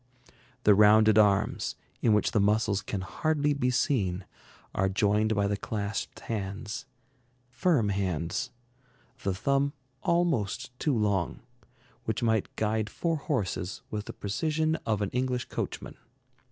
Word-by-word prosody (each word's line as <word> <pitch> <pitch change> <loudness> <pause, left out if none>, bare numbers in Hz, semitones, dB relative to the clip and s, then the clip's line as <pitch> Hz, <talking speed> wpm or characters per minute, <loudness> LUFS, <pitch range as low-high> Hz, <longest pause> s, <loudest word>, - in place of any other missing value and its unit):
The 105 - +7
rounded 110 +1 +6
arms, 105 0 +2 0.3
in 115 - +4
which 105 - +2
the 105 - +2
muscles 105 0 +2
can 100 -2 -4
hardly 150 - 0
be 140 -3 +1
seen, 100 -8 +1 0.5
are 95 0 +1
joined 105 +2 +2
by 100 -1 +2
the 100 0 +1
clasped 100 0 -4
hands, 105 +1 -4 0.6
firm 130 - +2
hands, 90 -5 -1 0.7
the 95 -2 -1
thumb 140 +8 +1 0.3
almost 135 - 0
too 145 -6 +1
long, 100 -5 0 0.6
which - - -1
might 110 -3 +1
guide 110 0 0
four 165 -2 -1
horses 105 - -2
with 105 -1 -3
the - - -7
precision 155 +9 0
of 105 -2 +1
an 100 - -2
English 125 0 -1
coachman. - - -4
105 Hz, 130 wpm, -29 LUFS, 100-130 Hz, 0.7 s, The